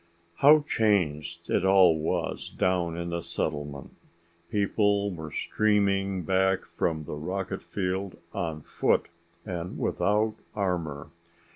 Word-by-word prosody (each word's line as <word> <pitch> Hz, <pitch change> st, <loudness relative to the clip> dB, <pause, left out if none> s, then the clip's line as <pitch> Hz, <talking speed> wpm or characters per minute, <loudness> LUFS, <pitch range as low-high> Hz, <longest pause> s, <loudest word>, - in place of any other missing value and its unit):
How 150 Hz, +2 st, +7 dB
changed 95 Hz, -, 0 dB
it -, -, +2 dB
all 95 Hz, -3 st, +6 dB
was 80 Hz, -, -2 dB
down 85 Hz, -3 st, 0 dB
in 85 Hz, 0 st, -4 dB
the 85 Hz, 0 st, -2 dB
settlement! 75 Hz, -3 st, -4 dB, 0.6 s
People 100 Hz, 0 st, +1 dB
were 80 Hz, -2 st, -7 dB
streaming 100 Hz, 0 st, +1 dB
back 95 Hz, +2 st, +2 dB
from 80 Hz, -2 st, -2 dB
the -, -, -7 dB
rocket 95 Hz, +5 st, -3 dB
field 95 Hz, 0 st, -3 dB, 0.2 s
on 80 Hz, -5 st, -3 dB
foot -, -, +1 dB, 0.4 s
and 90 Hz, -2 st, -5 dB
without 105 Hz, +2 st, +1 dB, 0.2 s
armor. 85 Hz, -7 st, -2 dB
95 Hz, 115 wpm, -27 LUFS, 80-100 Hz, 0.6 s, How